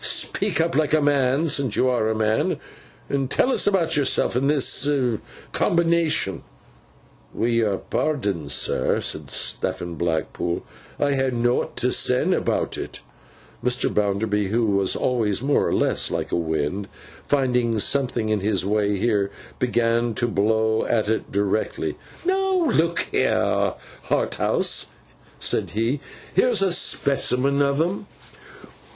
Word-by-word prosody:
'Speak 200 Hz, -7 st, +1 dB
up 165 Hz, +1 st, +1 dB
like 155 Hz, +1 st, +2 dB
a -, -, +3 dB
man, 145 Hz, +1 st, +2 dB
since 140 Hz, -7 st, 0 dB
you 130 Hz, -, +2 dB
are 120 Hz, -4 st, +1 dB
a 110 Hz, -, 0 dB
man, 110 Hz, 0 st, +1 dB, 0.5 s
and 135 Hz, -2 st, -1 dB
tell 260 Hz, -, +2 dB
us -, -, +2 dB
about 185 Hz, -5 st, +2 dB
yourself 140 Hz, -4 st, +1 dB
and 135 Hz, +3 st, +1 dB
this 145 Hz, -1 st, +2 dB, 0.6 s
Combination.' 170 Hz, -, +1 dB, 0.9 s
'Wi' 115 Hz, -, 0 dB
yor 110 Hz, -4 st, +1 dB
pardon, 100 Hz, -, -2 dB
sir,' -, -, +1 dB
said -, -, -3 dB
Stephen 85 Hz, -1 st, -1 dB
Blackpool, 85 Hz, +1 st, -2 dB, 0.4 s
'I 145 Hz, -1 st, +2 dB
ha' 135 Hz, -1 st, 0 dB
nowt 120 Hz, 0 st, 0 dB
to -, -, +2 dB
sen -, -, +2 dB
about -, -, -1 dB
it.' -, -, -7 dB, 0.6 s
Mr. 125 Hz, 0 st, +1 dB
Bounderby, 105 Hz, 0 st, 0 dB
who 110 Hz, 0 st, +1 dB
was 100 Hz, -1 st, +2 dB
always 115 Hz, -4 st, 0 dB
more 145 Hz, +1 st, +2 dB
or -, -, -1 dB
less -, -, +1 dB
like -, -, -3 dB
a -, -, +1 dB
Wind, 80 Hz, +3 st, -2 dB, 0.4 s
finding 125 Hz, -5 st, +1 dB
something 125 Hz, -1 st, +1 dB
in 110 Hz, -1 st, +1 dB
his 100 Hz, -2 st, 0 dB
way 105 Hz, 0 st, +1 dB
here, 100 Hz, -2 st, +1 dB, 0.3 s
began 115 Hz, -1 st, +1 dB
to 120 Hz, -, 0 dB
blow 110 Hz, +1 st, +1 dB
at 110 Hz, -2 st, 0 dB
it 110 Hz, -, -2 dB
directly. 100 Hz, +1 st, -1 dB, 0.3 s
'Now, 375 Hz, -4 st, +1 dB
look 170 Hz, -1 st, +2 dB
here, -, -, +1 dB, 0.3 s
Harthouse,' -, -, +1 dB, 0.5 s
said -, -, 0 dB
he, 115 Hz, +6 st, -1 dB, 0.3 s
'here's 195 Hz, 0 st, +3 dB
a 190 Hz, -, +2 dB
specimen 140 Hz, -3 st, +2 dB
of 140 Hz, 0 st, +1 dB
'em. 185 Hz, +5 st, -1 dB
120 Hz, 135 wpm, -23 LUFS, 105-145 Hz, 0.9 s, a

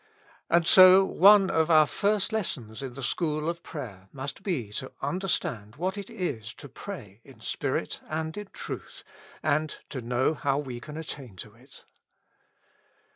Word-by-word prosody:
And 170 Hz, 0 st, +4 dB
so 185 Hz, +2 st, +8 dB
one 195 Hz, +1 st, +6 dB
of 160 Hz, 0 st, +2 dB
our 155 Hz, -2 st, +7 dB
first 205 Hz, +6 st, 0 dB
lessons 125 Hz, -, -3 dB
in 130 Hz, -2 st, -5 dB
the 135 Hz, -, -7 dB
school 155 Hz, +3 st, -1 dB
of 170 Hz, 0 st, -2 dB
prayer 100 Hz, -, -8 dB
must 140 Hz, +5 st, -6 dB
be 145 Hz, -, -2 dB
to 130 Hz, +5 st, -4 dB
understand 135 Hz, -, -2 dB
what 185 Hz, +5 st, -2 dB
it 200 Hz, -1 st, -7 dB
is 140 Hz, -, -4 dB
to -, -, -11 dB
pray 125 Hz, -, -9 dB
in 130 Hz, -5 st, -16 dB
spirit -, -, -3 dB
and 160 Hz, 0 st, -3 dB
in 210 Hz, -1 st, -6 dB
truth, -, -, -8 dB, 0.4 s
and 155 Hz, +1 st, 0 dB
to 130 Hz, -, -5 dB
know 125 Hz, +5 st, +1 dB
how 140 Hz, -2 st, 0 dB
we 130 Hz, -4 st, -4 dB
can 150 Hz, +5 st, -9 dB
attain 140 Hz, -9 st, -7 dB
to 105 Hz, +3 st, -9 dB
it. 130 Hz, +5 st, -18 dB
150 Hz, 160 wpm, -27 LUFS, 125-180 Hz, 0.4 s, so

